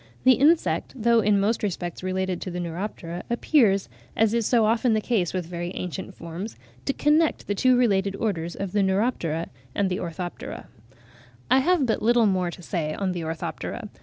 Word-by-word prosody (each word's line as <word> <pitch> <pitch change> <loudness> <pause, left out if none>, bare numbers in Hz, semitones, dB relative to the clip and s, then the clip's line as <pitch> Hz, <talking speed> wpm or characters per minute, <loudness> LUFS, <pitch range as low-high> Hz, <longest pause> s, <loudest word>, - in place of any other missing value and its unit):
The 255 - +7
insect, 270 - +2
though 235 0 +4
in 205 -1 +3
most 215 +3 +1
respects 175 -4 -3
related 185 -1 -2
to - - -4
the 180 0 -4
Neuroptera, 175 0 -5
appears, 235 -5 +3 0.3
as 220 0 +3
is 235 -2 +1
so 235 -3 +4
often 225 +2 +2
the 215 - +3
case 210 -6 0
with 185 -2 -2
very 175 +1 -5
ancient 185 +1 -5
forms, 170 +6 -7 0.3
to 275 - +1
connect 305 +3 +2
the 205 - -1
two 255 +5 +3
related 200 -5 +2
Orders 175 -6 -2
of 195 -2 -4
the 205 - +2
Neuroptera 190 -5 0 0.3
and 195 -2 +1
Orthoptera. 175 0 -5 0.9
I 260 - +7
have 330 +1 +3
but 225 - 0
little 235 0 +4
more 185 -3 +1
to 175 +1 -10
say 155 -4 -2
on 195 -2 -1
the 175 -1 -3
Orthoptera. 160 0 -5
195 Hz, 180 wpm, -25 LUFS, 175-230 Hz, 0.9 s, The